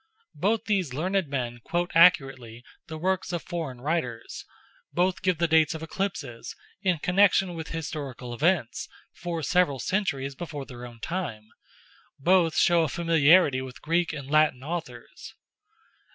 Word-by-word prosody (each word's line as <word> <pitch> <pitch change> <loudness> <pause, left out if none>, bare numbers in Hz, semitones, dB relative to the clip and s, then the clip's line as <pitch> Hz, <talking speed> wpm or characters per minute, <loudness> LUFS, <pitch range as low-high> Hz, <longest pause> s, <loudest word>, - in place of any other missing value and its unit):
Both 220 +3 0
these 185 - 0
learned 185 +3 0
men 125 -3 -3
quote 175 +1 -1
accurately 135 -9 +3 0.2
the 160 - -6
works 185 +2 -1
of 175 -2 -3
foreign 155 -8 -5
writers; 160 +4 -3 0.5
both 180 +1 +1
give 185 -3 +1
the 170 +1 +1
dates 160 0 +3
of 160 - -6
eclipses, 140 -10 -4 0.3
in 185 -4 +1
connection 190 +2 +3
with 160 -1 -6
historical 140 -6 -5
events 150 -2 0 0.2
for 170 -2 -4
several 180 -3 +2
centuries 140 - -1
before 145 -1 -6
their 125 -1 -9
own 120 -1 -15
time; 135 -13 -4 0.7
both 170 +2 +3
show 170 -1 +4
a 160 - 0
familiarity 165 -3 +4
with 130 -1 -9
Greek 170 +2 +1
and 140 -2 -7
Latin 155 -4 +3
authors. 145 -7 -7
160 Hz, 140 wpm, -26 LUFS, 135-180 Hz, 0.7 s, show